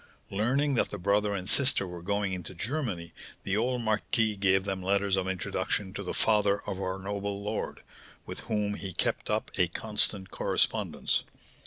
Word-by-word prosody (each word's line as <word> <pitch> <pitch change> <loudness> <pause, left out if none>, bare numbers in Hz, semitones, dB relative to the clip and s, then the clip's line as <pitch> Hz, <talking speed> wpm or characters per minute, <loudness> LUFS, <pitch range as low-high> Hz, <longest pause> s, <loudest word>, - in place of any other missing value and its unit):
Learning 130 +8 +1
that 120 - +2
the 105 - -5
brother 100 +2 +1
and 95 -1 -4
sister 130 -2 +6
were 90 -1 -7
going 100 +1 -1
into 90 0 -6
Germany, 100 - -3 0.3
the 100 - 0
old 120 +2 0
marquis 110 0 +1
gave 95 -1 +3
them 95 -1 -2
letters 100 +1 +2
of 95 -1 -1
introduction 95 +1 -2
to 100 - -5
the 90 - -4
father 105 -2 +2
of 95 -2 -4
our 95 0 -2
noble 100 +1 -4
lord, 105 +1 -4 0.4
with - - -7
whom 105 -1 0
he 95 -2 -5
kept - - -1
up - - -1
a 90 - +5
constant 105 0 0
correspondence. - - 0
100 Hz, 170 wpm, -29 LUFS, 95-105 Hz, 0.4 s, sister